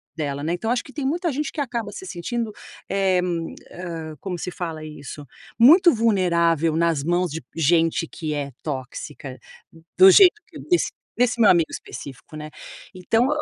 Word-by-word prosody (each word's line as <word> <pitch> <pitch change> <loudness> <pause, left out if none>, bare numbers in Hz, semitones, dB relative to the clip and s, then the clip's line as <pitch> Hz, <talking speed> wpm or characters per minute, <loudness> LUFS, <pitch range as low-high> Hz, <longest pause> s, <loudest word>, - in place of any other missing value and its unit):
dela, 145 -3 -3
né. 165 +3 -1
Então, 200 +6 -3
acho 245 0 0
que 270 - -14
tem 290 -3 -4
muita 335 +4 0
gente 290 +2 -3
que - - -7
acaba 235 -6 -3
se 380 - -9
sentindo, 225 - -4 0.4
eh, 195 -2 +2 0.5
hã, 165 -3 -7
como 180 +2 -5
se 180 - -5
fala 165 -3 -5
isso? 145 -1 -9 0.3
Muito 340 +9 +8
vulnerável 170 -7 +2
nas 165 -3 +1
mãos 175 +1 0
de 160 +2 -5
gente 165 +1 +2
que 155 -1 -5
é 145 -1 -3
tóxica, 135 -1 -6 0.6
do 190 +1 +9
jeito 370 - +8
que - - -12
desse 350 -1 +2 0.2
desse 245 0 +1
meu 220 - +6
amigo 170 -3 +2
específico, 135 +2 -9
né, 155 0 -7 0.5
então 225 +7 +1
175 Hz, 165 wpm, -23 LUFS, 155-230 Hz, 0.6 s, do